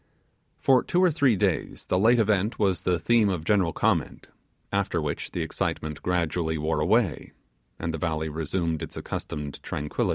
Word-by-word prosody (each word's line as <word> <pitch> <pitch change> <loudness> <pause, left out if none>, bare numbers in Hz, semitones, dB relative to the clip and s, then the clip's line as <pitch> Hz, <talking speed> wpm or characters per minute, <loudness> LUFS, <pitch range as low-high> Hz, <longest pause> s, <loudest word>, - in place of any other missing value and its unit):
For 130 -2 +4
two 180 0 +1
or 180 - +5
three 140 -6 +3
days 90 - -1
the 90 - +1
late 115 +5 +5
event 105 -1 +1
was 95 -4 +1
the 90 -1 +1
theme 110 +4 +3
of 90 -5 -2
general 95 -4 +3
comment; - - -1 0.4
after 100 -3 0
which 75 -2 -3
the - - -3
excitement 75 -1 -3
gradually 85 -2 0
wore 80 +1 -1
away, 95 - +1 0.4
and 80 - -3
the 80 - -4
valley 80 -2 -1
resumed 80 +1 -2
its - - -7
accustomed 75 -1 -5
tranquili 75 0 -2
90 Hz, 165 wpm, -26 LUFS, 80-105 Hz, 0.4 s, or